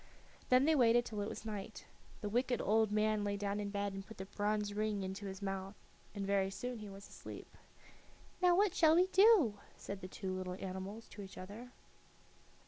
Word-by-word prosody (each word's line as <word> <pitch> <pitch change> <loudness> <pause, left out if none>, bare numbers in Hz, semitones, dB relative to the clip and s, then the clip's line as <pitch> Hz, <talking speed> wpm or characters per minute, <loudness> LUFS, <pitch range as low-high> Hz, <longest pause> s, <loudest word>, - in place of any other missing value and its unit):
Then 255 +2 +6
they 320 - +5
waited 240 -3 +5
till 215 -3 -4
it 205 - -2
was - - -7
night. 210 -1 -6 0.4
The 210 - -2
wicked 245 +3 +1
old 220 0 +3
man 215 0 +2
lay 200 0 -1
down 200 0 -2
in 205 -1 -2
bed 200 0 -2
and 195 0 -5
put 220 +1 -12
the 190 - -5
bronze 205 +1 -1
ring 210 -1 -1
into 190 +2 -5
his 190 +1 -7
mouth, 195 0 -3 0.4
and 200 -1 -2
very 195 -1 +2
soon 245 +4 -5
he 210 -1 -7
was 195 +1 -10
asleep. - - -10 0.9
"Now, 355 -1 +6
what 395 0 +3
shall 320 -3 +5
we 360 +2 +6
do?" 375 - +5 0.2
said 200 -1 -6
the 185 - -5
two 190 0 -4
little 185 -1 -4
animals 190 +4 -6
to 205 - -9
each 190 -1 -10
other. 205 +7 -8
205 Hz, 200 wpm, -36 LUFS, 195-230 Hz, 0.9 s, Then